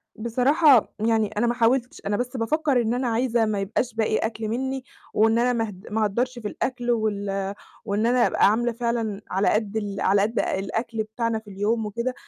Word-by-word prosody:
بصراحة، 250 +4 +3
يعني 220 -1 +2
أنا 240 - +2
ما 240 - +2
حاولتش، 245 +3 +1
أنا 205 0 0
بس 250 +1 -3
بافكّر 280 +2 +1
إن 225 0 0
أنا 250 +1 -1
عايزة 235 0 +1
ما 210 -2 -1
يبقاش 220 +5 -2
باقي 220 -1 +1
أكل 220 -1 -3
مِنّي، 265 +4 -2 0.3
وإن 225 +2 +3
أنا 245 +1 +2
ما 225 -2 -1
هد 190 0 -12
ما 220 0 +1
اهدّرش 240 +5 -1
في 215 - -4
الأكل، 245 +2 -2
وال 200 -3 -1 0.3
وإن 210 +1 0
أنا 245 0 +4
أبقى - - +3
عاملة 240 +2 +1
فعلًا 230 -3 -2
على 190 +2 +1
قد 215 0 0
ال 200 -2 -3
على 195 +1 +3
قد 220 +3 0
الأكل 220 +3 -2
بتاعنا 225 +1 -2
في 220 -2 -15
اليوم 210 +3 -1
وكده. 235 +5 -2
225 Hz, 195 wpm, -24 LUFS, 210-245 Hz, 0.3 s, أنا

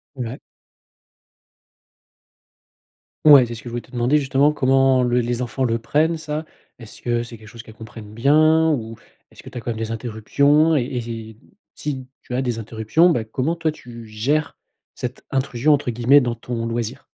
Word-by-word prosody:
Ouais. 125 -1 -5 2.9
Ouais, 145 -5 +8
c'est 120 - -6
ce 115 - -10
que - - -8
je - - -7
voulais 120 +1 -4
te - - -22
demander 125 +4 +2
justement, 140 +1 +2
comment 135 -2 +3
l 120 0 +2
les 120 +1 -2
enfants 125 +2 -3
le 115 -2 +1
prennent, 150 +8 +1
ça? 155 0 -4 0.4
Est-ce 115 -2 -12
que 120 -1 0
c'est 115 -1 -10
quelque 110 - -15
chose 115 +1 -11
qu'elles 110 - -14
comprennent 110 -1 -11
bien? 155 +6 +4
Ou 115 -5 -4 0.3
est-ce - - -16
que - - -10
tu - - -13
as - - -3
quand 120 - -4
même 110 - -4
des 115 0 -3
interruptions? 140 +8 +2
Et 140 - +2
et 115 -2 -6 0.4
si 135 -3 -5
tu 125 - -7
as 130 - 0
des 120 -3 -2
interruptions, 115 +10 +2
ben 120 -9 0
comment 130 +8 -2
toi 165 -2 -1
tu 120 -6 -12
gères 135 +9 -1 0.4
cette 125 +1 -6
intrusion 135 +1 +1
entre 140 -4 +1
guillemets 120 +5 +5
dans 120 -3 -1
ton 120 -1 -5
loisir? 115 -1 -4
125 Hz, 185 wpm, -21 LUFS, 115-145 Hz, 2.9 s, Ouais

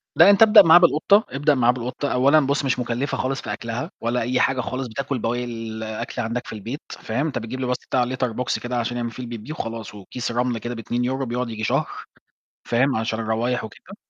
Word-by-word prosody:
لا - - +8
أنت 200 +2 +5
ابدأ 215 -1 +9
معاه 165 -3 +8
بالقطة 180 +5 +4
ابدأ 145 +2 +2
معاه 120 -1 +4
بالقطة، 125 +3 -4
أولًا 140 +5 +5
بص 140 0 0
مش 130 -1 0
مُكلفة 125 +3 -2
خالص 135 +1 -2
في - - -4
أكْلها 115 +1 -5
ولا 120 +1 0
أي 125 +3 0
حاجة 130 -1 +2
خالص 130 +1 -4
بتاكل 140 +2 -3
بواقي 120 +2 -1
الأكل 110 -1 -5
عندك 120 +2 -3
في - - -7
البيت، 115 +8 -6
فاهم، 120 +7 -3
أنت 145 - -3
بتجيب 115 +4 -6
له 130 - -2
بس 125 - 0
بتاع 125 -1 +2
Litter 125 -2 -2
Box 125 - -1
كده 120 0 -2
عشان 120 +1 -2
يعمل 120 -1 -3
فيه 125 +3 -8
البِبّيه 120 +4 -7
وخلاص 115 - -6
وكيس 120 +5 -5
رمل 120 0 0
كده 120 +2 -5
ب2€ 125 +4 -2
بيقعد 125 0 -3
ييجي 110 -1 -6
شهر، - - +1 0.8
فاهم، 130 +4 +2
عشان 110 0 -2
الروايح 115 +3 -1
وكده. 110 - -11
125 Hz, 215 wpm, -23 LUFS, 115-135 Hz, 0.8 s, ابدأ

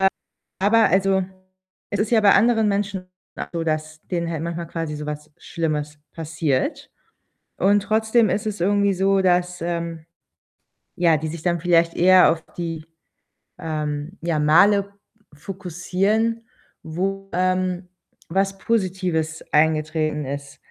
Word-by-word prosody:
Äh, 190 - +5 0.5
aber 220 +3 +4
also 190 0 +2 0.7
es 205 - -2
ist 210 +1 0
ja 230 - +4
bei 205 -2 +6
anderen 225 -2 +4
Menschen 200 -2 -2 0.3
auch - - -4
so, 165 -1 -2
dass 155 0 -3
denen 170 -2 -1
halt 160 -2 -3
manchmal 170 0 -4
quasi 165 -2 -4
so 150 0 -6
was 150 0 -6
schlimmes 150 -2 -3
passiert, 160 -4 -2 0.7
und 205 +2 +3
trotzdem 220 +1 +2
ist 210 +2 -1
es 210 -3 -3
irgendwie 200 +1 +2
so, 195 +1 +2
dass, 180 -1 +1
ähm, 170 -1 -4 0.9
ja, 170 -3 +3
die 155 +1 -4
sich 165 0 -7
dann 175 -1 +1
vielleicht 170 -1 +2
eher 185 +1 +6
auf 165 -1 -5
die, 165 -2 -5 0.7
ähm, 150 +2 -4
ja 165 -2 0
Male 200 +7 +4 0.4
fokussieren, 195 +6 -1 0.3
wo, 195 +4 -3
ähm, 185 0 0 0.4
was 195 +2 0
Positives 185 -7 -1
eingetreten 155 -1 +1
ist. 140 +1 -6
175 Hz, 135 wpm, -22 LUFS, 160-195 Hz, 0.9 s, bei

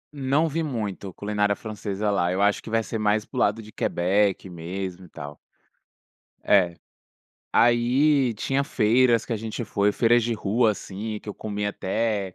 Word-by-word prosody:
Não 140 +4 +1
vi 160 +2 -2
muito 105 - -4
culinária 105 0 0
francesa 105 -1 -3
lá. 90 -3 +1
Eu 95 - -1
acho 105 0 +2
que - - -10
vai 115 0 +1
ser 110 - -4
mais 105 0 +1
para - - -15
o - - +1
lado 105 +2 +2
de 110 - -13
Quebec 95 +2 +1
mesmo 90 +2 -6
e - - -16
tal. 75 -1 -9 1.0
É. 90 -4 +3 0.8
Aí, 125 +3 +3
tinha 135 +6 -1
feiras 120 -1 +3
que 120 - -3
a - - 0
gente 110 +2 -5
foi. 100 0 +1
Feiras 120 +2 +3
de 115 +1 -1
rua, 110 +2 +2
assim, 105 +2 -5
que - - -12
eu 105 - -5
comi 105 -1 -3
até 100 -1 -2
105 Hz, 175 wpm, -25 LUFS, 100-120 Hz, 1.0 s, É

